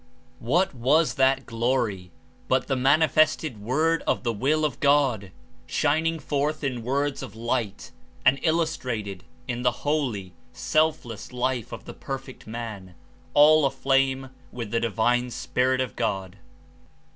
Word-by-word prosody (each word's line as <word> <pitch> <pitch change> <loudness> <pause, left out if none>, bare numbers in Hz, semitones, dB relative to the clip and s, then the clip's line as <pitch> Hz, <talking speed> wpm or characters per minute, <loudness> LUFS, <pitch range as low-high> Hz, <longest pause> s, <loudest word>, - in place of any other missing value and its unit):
^' - - -31 0.4
What 175 +10 +1
was 140 +6 +2
that 135 0 +2
gloi7 115 -6 -1 0.4
but 130 0 +2
the 135 - 0
manifested 155 -2 +2
Word 155 +9 +1
of - - +1
the 120 -2 0
Will 150 +8 +1
of 145 -5 -3
God, 135 -9 +2 0.4
shining 160 - +1
forth 150 0 -2
In 130 -4 -2
words 140 +4 -1
of 120 -6 -8
light 115 -2 -3 0.3
and 135 +1 +5
illustrated 125 - -1 0.2
in 120 -1 -3
the 125 +2 -1
holy, 125 - -1 0.2
selfless 155 -9 -1
life 125 -2 -2
of - - -8
the - - -8
Perfect 135 -3 -7
Man, 110 -5 -7 0.4
all 150 +1 +7
aflame 135 -1 +1 0.2
with 115 -4 -6
the 115 - +1
Divine 120 +2 +1
Spirit 130 +2 0
of 130 - -3
God! 100 -4 -2
130 Hz, 135 wpm, -25 LUFS, 115-145 Hz, 0.4 s, all